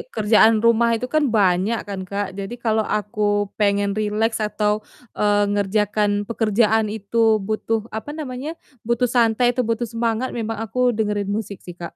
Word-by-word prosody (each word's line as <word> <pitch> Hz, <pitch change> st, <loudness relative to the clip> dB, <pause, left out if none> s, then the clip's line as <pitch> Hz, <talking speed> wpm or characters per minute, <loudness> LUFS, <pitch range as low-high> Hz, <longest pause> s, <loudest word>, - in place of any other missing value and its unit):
kerjaan 220 Hz, +1 st, +5 dB
rumah 235 Hz, 0 st, +4 dB
itu 250 Hz, +2 st, -4 dB
kan 310 Hz, -, +4 dB
banyak 195 Hz, +2 st, +2 dB
kan, 195 Hz, -2 st, -5 dB
Kak, 200 Hz, 0 st, -2 dB
jadi 195 Hz, +4 st, -5 dB
kalau 220 Hz, -1 st, +2 dB
aku 210 Hz, 0 st, -6 dB, 0.4 s
pengen 200 Hz, -1 st, +2 dB
rileks 215 Hz, +2 st, 0 dB
atau, 210 Hz, 0 st, 0 dB, 0.4 s
eee, 205 Hz, 0 st, +3 dB
ngerjakan 205 Hz, +1 st, +1 dB, 0.2 s
pekerjaan 220 Hz, -1 st, +2 dB
itu 210 Hz, +2 st, -6 dB, 0.3 s
butuh 220 Hz, +1 st, -1 dB, 0.2 s
apa 290 Hz, +7 st, -6 dB
namanya, 270 Hz, +1 st, -5 dB, 0.4 s
butuh 235 Hz, +1 st, +2 dB
santai 235 Hz, +1 st, +3 dB
atau 250 Hz, +1 st, -1 dB
butuh 230 Hz, +1 st, -1 dB
semangat, 230 Hz, +2 st, -1 dB
memang 225 Hz, 0 st, -3 dB
aku 225 Hz, +3 st, -5 dB, 0.2 s
dengerin 210 Hz, -2 st, -1 dB
musik 205 Hz, -2 st, -4 dB
sih, 175 Hz, -, -9 dB
Kak. 170 Hz, -1 st, -7 dB
220 Hz, 155 wpm, -21 LUFS, 205-230 Hz, 0.4 s, kerjaan